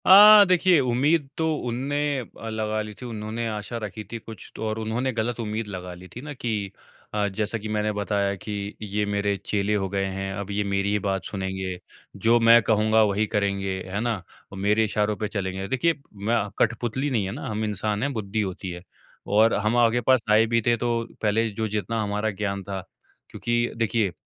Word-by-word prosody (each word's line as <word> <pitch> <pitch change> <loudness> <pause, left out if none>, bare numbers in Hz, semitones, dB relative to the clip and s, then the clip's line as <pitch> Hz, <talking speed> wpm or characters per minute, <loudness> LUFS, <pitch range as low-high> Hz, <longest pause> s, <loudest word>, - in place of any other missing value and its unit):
अ, 205 +2 +10
देखिए, 180 -2 +5
उम्मीद 135 +4 +2
तो 160 -1 +1 0.2
उनने 130 +5 -2 0.2
अ, 115 -2 -8
लगा 110 0 -1
ली 105 0 -6
थी। - - -6
उन्होंने 115 0 -4
आशा 110 +2 -4
रखी 105 +1 -5
थी 115 - -3
कुछ 110 -3 -11
तो - - -5
और 110 +1 -2
उन्होंने 115 +4 -1
ग़लत 115 +1 -2
उम्मीद 110 0 -3
लगा 90 -3 -6
ली 90 +1 -12
थी 125 - -6
ना 145 +1 -7
कि 110 -7 -3 0.4
अ, 105 -1 +1
जैसा 105 +3 -2
कि 110 0 -6
मैंने 105 0 0
बताया 100 -1 0
कि 95 +3 -8 0.3
ये 105 0 -1
मेरे 100 0 0
चेले 105 0 0
हो 95 -2 -1
गए 100 0 -1
हैं 95 0 -3
अब 100 +1 -5
ये 105 +1 0
मेरी 100 +1 0
बात 95 -1 -2
सुनेंगे। 95 -2 -3 0.4
जो 115 +4 +3
मैं 115 0 +7
कहूँगा 110 0 +3
वही 105 +1 +2
करेंगे 100 -2 -1 0.2
है 100 - 0
ना 120 -1 0 0.4
और 100 - -8
मेरे 105 +3 +2
इशारों 105 0 0
पे 105 - -2
चलेंगे। 95 -2 -3
देखिए, 130 +10 +2 0.2
मैं 105 +4 0 0.2
कठपुतली 120 +4 0
नहीं 115 -7 0
है 95 - -3
ना 125 - -6
हम 110 0 -2
इंसान 105 +1 -1
हैं, 140 - 0
बुद्धि 110 -1 -2
होती 95 -1 -4
है 90 0 -8 0.4
और 110 +3 +4
हम 110 +3 +1
आपके 120 0 +4
पास 130 0 +3
आए 110 +1 +6
भी 115 - +4
थे 120 - +5
तो 115 0 0 0.2
पहले 110 +1 +2
जो 110 +1 -2
जितना 110 +1 -2
हमारा 105 +1 -1
ज्ञान 100 -1 -2
था। 95 0 -4 0.5
क्योंकि 120 0 0
देखिए, 115 -3 +1
105 Hz, 200 wpm, -25 LUFS, 100-115 Hz, 0.5 s, अ